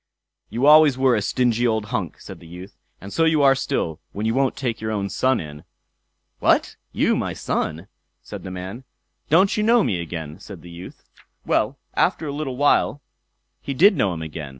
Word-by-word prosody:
"You 120 +4 -1
always 150 -2 +7
were 130 -1 +3
a 105 - 0
stingy 120 +3 +1
old 110 -2 0
hunks", 95 -10 -4
said - - -9
the 85 - -14
youth, 90 +3 -11 0.2
"and 100 +2 -10
so 165 - +2
you 160 -3 +3
are 135 -1 +6
still, 80 - -2
when 105 +2 -4
you 115 - +1
won't 135 0 +1
take 120 -5 -3
your 110 - -3
own 100 -2 -2
son 130 +4 +1
in." 75 -1 -9 0.8
"What, - - +2 0.2
you - - +1
my - - -2
son!" 80 +5 -3 0.4
said - - -8
the - - -8
man. 95 +7 -7 0.5
"Don't 185 +6 +4
you 210 - 0
know 230 +1 +4
me 90 -4 -1
again?" 80 -1 -7
said 95 -5 -11
the 85 - -11
youth. 85 +2 -11 0.4
Well, - - 0 0.2
after 160 - +1
a 145 - -4
little 140 -4 -4
while 145 0 +2 0.6
he 140 - -5
did 195 +8 +6
know 100 - +1
him 80 -2 -5
again. 75 -2 -7
115 Hz, 195 wpm, -22 LUFS, 90-140 Hz, 0.8 s, always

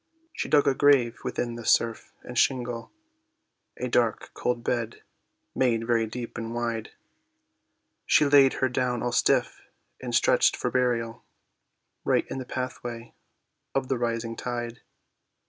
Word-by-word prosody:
She - - -4
dug 145 -1 +4
a 140 - +4
grave 130 -4 +3
within 120 -1 -2
the 120 0 -7
surf 115 0 +1
and 125 - -9
shingle, 120 -2 0 0.9
A 125 - -3
dark, 120 -2 0
cold 120 -1 -2
bed, 115 -2 -2 0.5
made 115 -3 +1
very 115 -1 +1
deep 120 +1 -6
and 115 +1 -5
wide, 115 -2 -2 1.2
She 150 - +5
laid 140 -2 +6
her 130 - +1
down 125 -1 -1
all 120 - -1
stiff - - +1 0.4
and - - -3
stretched - - +4
for - - -2
burial, 120 -2 0 0.8
Right - - +2
in - - -3
the 130 - -6
pathway 120 -2 -5 0.6
of 135 -1 0
the 130 -3 0
rising 115 -1 -2
tide. 120 -1 -5
120 Hz, 140 wpm, -26 LUFS, 115-125 Hz, 1.2 s, laid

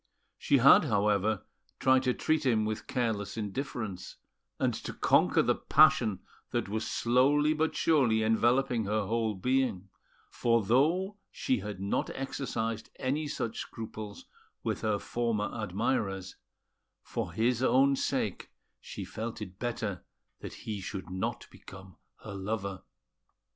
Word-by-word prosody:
She 140 - +3
had, 135 +4 +7
however, 105 -3 +1 0.3
tried 130 0 +4
to 125 - +3
treat 155 -1 +1
him 115 -5 +2
with 110 0 -4
careless 115 -5 -2
indifference 110 -3 -4 0.4
and - - +1
to - - -6
conquer - - +4
the - - +3
passion 145 -10 +4 0.3
that - - -1
was 110 +2 -3
slowly 140 +5 +3
but 160 +1 0
surely 125 -9 +3
enveloping 120 +1 +2
her 105 +1 0
whole 110 0 0
being; 110 -3 0 0.4
for 115 -2 +2
though 165 - +2
she 260 -1 -1
had 105 -3 -6
not 100 +1 -1
exercised 115 -5 -3
any 145 +4 -1
such 120 -6 -3
scruples 110 -2 -7 0.4
with - - -2
her 110 -2 +1
former 115 -1 -1
admirers, 100 -2 -2 0.7
for - - -4
his 120 +2 +1
own 135 +1 +4
sake - - -2 0.3
she - - -7
felt 115 +1 -5
it 95 -3 -8
better 115 -6 -3 0.4
that - - -8
he 105 -3 -4
should 95 -2 -6
not 95 0 -3
become 95 -2 -13 0.3
her - - -7
lover. 100 -1 -3
115 Hz, 130 wpm, -30 LUFS, 100-130 Hz, 0.7 s, had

